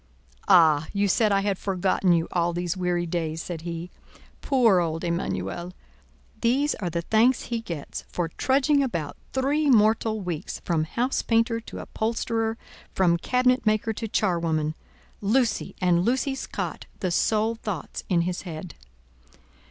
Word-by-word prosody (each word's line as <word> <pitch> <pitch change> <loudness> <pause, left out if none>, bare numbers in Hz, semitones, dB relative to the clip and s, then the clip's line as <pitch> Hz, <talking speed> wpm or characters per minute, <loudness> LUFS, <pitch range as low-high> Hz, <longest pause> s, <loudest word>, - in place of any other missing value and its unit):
"Ah! 160 -3 +5
you 200 0 +2
said 215 +2 +3
I 195 0 +3
had 200 -2 -1
forgotten 190 -1 +1
you 165 -1 +2
all 175 -1 +1
these 175 0 -2
weary 180 -1 0
days," 165 -2 -2
said 165 -1 -5
he. 170 +1 -6 0.5
"Poor 235 -9 +4
old 165 -1 -2
Emanuel! 170 - -3 0.7
These 270 +5 +2
are 180 -4 -3
the 170 0 -3
thanks 230 +7 +3
he 235 -1 -3
gets 170 -10 -6
for 175 -2 -2
trudging 280 - +2
about 170 - -2 0.2
three 285 +3 +1
mortal 220 -1 +3
weeks 175 -6 -4
from 160 -3 +1
house 245 +10 -1
painter 230 0 +1
to 230 - -10
upholsterer, 225 0 -2 0.3
from 175 -3 +3
cabinet 250 +6 +2
maker 215 +1 +2
to 225 +1 -4
charwoman. 165 -7 0 0.5
Lucy 225 +3 +1
and 175 -1 +3
Lucy's 265 +4 0
cot, - - -5
the 185 -3 0
sole 220 +5 +2
thoughts 210 -8 -5
in 175 -3 +3
his 180 +1 -2
head!" 170 -1 -7
190 Hz, 145 wpm, -25 LUFS, 170-230 Hz, 0.7 s, Ah